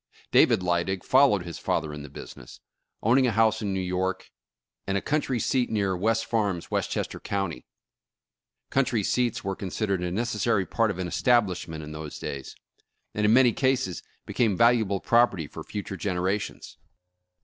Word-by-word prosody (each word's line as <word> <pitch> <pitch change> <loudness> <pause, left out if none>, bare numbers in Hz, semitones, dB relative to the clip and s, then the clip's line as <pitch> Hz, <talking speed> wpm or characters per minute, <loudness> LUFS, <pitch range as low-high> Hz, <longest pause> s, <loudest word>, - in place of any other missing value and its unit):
David 90 - +5
Lydig 90 +1 0
followed 130 -8 +4
his 85 -2 -7
father 75 -1 -1
in 75 - -7
the 75 - -9
business, - - -11 0.4
own 120 +5 +4
ing 130 - +3
a - - +1
house 110 0 +2
in 100 -2 -2
New 95 - -1
York, 95 +1 -2 0.6
and 95 0 +1
a - - +1
country 135 -1 -1
seat 125 +3 +1
near 100 -4 0
West 115 +5 0
Farms, 100 -7 -1
Westchester - - -2
County. 95 -10 -3 1.0
Country 125 -5 +1
seats 120 +3 0
were 95 -1 -2
consid 100 +3 -3
ered 90 -2 0
a 90 - -1
necessary 110 0 0
part 115 +3 +1
of 100 - -3
an 95 -1 -3
establishment 90 -7 +1
in 75 - -8
those 75 -1 -7
days, 70 -1 -6 0.6
and 105 - 0
in 110 - +5
many 125 -2 +5
cases 130 -8 0 0.2
became 110 -6 +1
valuable 115 -4 +3
property 115 -9 +2
for - - -9
future 100 -2 -6
generations. 95 +1 -3
100 Hz, 165 wpm, -26 LUFS, 90-115 Hz, 1.0 s, David